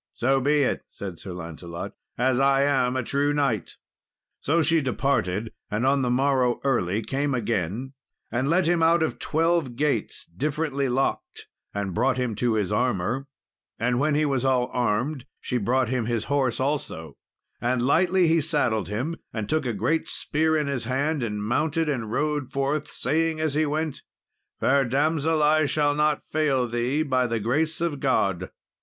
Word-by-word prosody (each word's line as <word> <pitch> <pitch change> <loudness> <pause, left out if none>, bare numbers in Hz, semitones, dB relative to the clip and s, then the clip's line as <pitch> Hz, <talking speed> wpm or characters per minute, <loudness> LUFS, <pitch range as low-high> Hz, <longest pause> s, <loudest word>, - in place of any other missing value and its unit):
"So 135 +2 +2
be 145 +2 +3
it," - - 0
said 95 -4 -8
Sir 95 - -8
Lancelot, 85 0 -7 0.2
"as 125 +1 +2
I 135 0 +4
am 130 -3 +2
a 130 - 0
true 140 +4 +1
knight." 135 -8 -1 0.6
So 160 +3 +2
she 160 +1 +3
departed, 115 -6 0 0.2
and 105 +4 -1
on 135 +1 +3
the 125 - 0
morrow, 130 -1 +2
early, 110 -6 +1
came 140 +3 -1
again, 115 +2 -2 0.4
and 125 +4 0
let 175 +4 +3
him 170 0 +2
out 165 0 +4
of 160 - -2
twelve 165 -5 +1
gates, 140 -5 -1
differently 140 - -2
locked, 135 +2 -2 0.3
and 100 -2 -3
brought 130 +5 +1
him 125 -3 -1
to 120 -1 +1
his 105 -2 0
armour; 120 +3 0 0.5
and 120 +1 0
when 150 +1 +2
he 155 +1 +2
was 135 -3 0
all 130 -2 +1
armed, 125 +4 -1
she 125 - -2
brought 125 +3 +1
him 125 -3 -1
his 120 -2 -1
horse 135 -3 0
also, 130 - -3 0.5
and 120 0 +1
lightly 180 +6 +3
he 165 0 +3
saddled 140 - 0
him, 125 - -3
and 110 -3 -4
took 155 -4 0
a - - 0
great 120 +10 0
spear 160 +1 0
in 150 - 0
his 140 -5 -2
hand, 140 +4 0
and 105 -3 -3
mounted 155 +8 0
and 120 -7 -2
rode 145 0 -1
forth, 140 +2 -1
saying, 160 +3 0
as 155 -2 0
he 155 +1 +1
went, 155 0 -2 0.6
"Fair 140 +1 +3
damsel, 150 +4 +1
I 155 +1 +4
shall 145 0 +2
not 150 0 +1
fail 140 -5 +1
thee, 120 +6 0
by 130 -4 +1
the 115 -1 -1
grace 150 +9 0
of 165 -5 -1
God." 100 -9 +1
135 Hz, 175 wpm, -25 LUFS, 120-150 Hz, 0.6 s, I